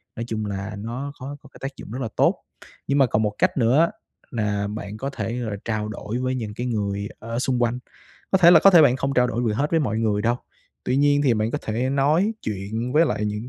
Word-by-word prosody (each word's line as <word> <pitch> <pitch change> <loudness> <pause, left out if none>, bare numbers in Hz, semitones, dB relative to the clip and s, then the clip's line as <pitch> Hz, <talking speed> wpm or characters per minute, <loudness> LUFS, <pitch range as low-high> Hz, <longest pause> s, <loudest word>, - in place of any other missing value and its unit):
Nói 115 - -4
chung 110 -2 -3
là 100 +1 -4
nó 120 +7 -5
có 140 +3 -6
có 135 - -16
cái - - -16
tác 135 +1 -5
dụng - - -10
rất 130 +3 -4
là 115 - -1
tốt. - - +3 0.5
Nhưng 140 - +1
mà 135 - +6
còn 110 -2 0
một 105 - 0
cách - - +1
nữa 135 +7 +4 0.4
là 105 -3 -1
bạn 105 0 -6
có 135 +5 -3
thể, 115 -2 -4
gọi 115 -3 -3
là, 100 - -4
trao 110 -2 -2
đổi 110 +2 -5
với 130 0 -1
những 110 -4 -4
cái 120 +3 -4
người 100 -3 -2
ở 115 +2 -4
xung 125 -1 0
quanh. 120 +1 0 0.5
Có 190 - +4
thể 170 -2 +8
là 165 -3 +8
có 195 - +7
thể 170 -3 +8
bạn 130 -4 +4
không 135 +1 -1
trao 125 0 +4
đổi 120 0 -2
vừa 110 -3 +1
hết 140 +7 -1
với 165 - +3
mọi 110 -6 -1
người 105 -2 0
đâu, 120 +2 +2 0.5
tuy 125 - 0
nhiên 145 0 +3
thì 130 -5 +3
bạn 110 +1 0
có 150 - -2
thể 120 +4 -1
nói 150 +10 +2
chuyện 110 +4 -3
với 160 +2 +5
lại 105 - -1
những 105 +3 -3
120 Hz, 265 wpm, -23 LUFS, 105-135 Hz, 0.5 s, thể